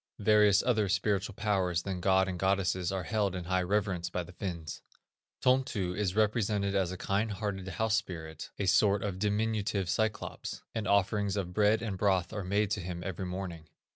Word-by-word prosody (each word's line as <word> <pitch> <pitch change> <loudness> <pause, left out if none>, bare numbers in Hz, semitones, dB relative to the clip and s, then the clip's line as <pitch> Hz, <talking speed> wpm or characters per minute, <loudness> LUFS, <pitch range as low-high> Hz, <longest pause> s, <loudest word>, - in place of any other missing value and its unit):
Various 105 -1 +5
other 110 -5 +2
spiritual 105 0 0
powers 95 -5 0
than 95 -2 -4
gods 95 +1 +3
and 90 -1 -4
goddesses 95 -2 +1
are 95 -1 -2
held 100 0 0
in 90 - -4
high 95 +2 +1
reverence 95 -2 0
by 90 0 -2
the 85 - -12
Finns. 85 -4 -5 0.6
Tontu 125 -9 +1
is 100 -2 -1
represented 105 -2 +1
as 95 -3 +1
a 95 - -5
kind 100 +4 0
hearted 95 -2 -4
house 110 +4 +1
spirit, 80 -7 -6
a 100 - -1
sort 100 +2 +3
of 95 -3 -3
diminutive 105 -1 0
Cyclops, 110 +3 -2
and 110 -2 -2
offerings 100 0 +2
of 90 -3 -3
bread 105 +3 +3
and 100 -5 -3
broth 95 -2 +1
are 105 -2 -3
made 100 +2 0
to 105 - 0
him 85 0 -5
every 95 0 -4
morning. 90 -4 -6
100 Hz, 180 wpm, -31 LUFS, 90-105 Hz, 0.6 s, Various